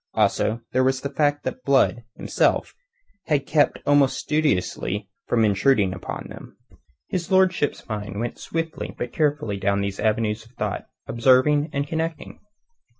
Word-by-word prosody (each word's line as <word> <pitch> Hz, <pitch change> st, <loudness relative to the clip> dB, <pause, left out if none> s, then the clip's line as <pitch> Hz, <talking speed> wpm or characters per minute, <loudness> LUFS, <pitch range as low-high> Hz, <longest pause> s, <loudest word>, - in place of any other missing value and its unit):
Also 115 Hz, +2 st, +1 dB
there 130 Hz, +1 st, +2 dB
was 130 Hz, 0 st, +1 dB
the 140 Hz, -, -4 dB
fact 145 Hz, 0 st, +1 dB
that 130 Hz, 0 st, -5 dB
Blood, 130 Hz, -3 st, +3 dB
himself, -, -, +1 dB, 0.5 s
had 145 Hz, -3 st, +1 dB
kept 150 Hz, 0 st, +2 dB
almost 145 Hz, -2 st, +4 dB
studiously 110 Hz, -8 st, -1 dB, 0.2 s
from 115 Hz, -2 st, +3 dB
intruding 100 Hz, -1 st, +3 dB
upon 95 Hz, -, -6 dB
them. -, -, -12 dB, 0.5 s
His 175 Hz, -2 st, -3 dB
lordship's 185 Hz, -5 st, +2 dB
mind 105 Hz, -2 st, -4 dB
went 120 Hz, +1 st, -4 dB
swiftly 165 Hz, -1 st, -4 dB
but 120 Hz, 0 st, -4 dB
carefully 145 Hz, -9 st, 0 dB
down 100 Hz, 0 st, +1 dB
these 100 Hz, 0 st, -3 dB
avenues 110 Hz, 0 st, 0 dB
of 115 Hz, +2 st, -21 dB
thought, 120 Hz, -, -3 dB, 0.2 s
observing 130 Hz, +5 st, +3 dB
and 140 Hz, 0 st, -1 dB
connecting. 160 Hz, +2 st, -4 dB
130 Hz, 145 wpm, -23 LUFS, 110-150 Hz, 0.5 s, almost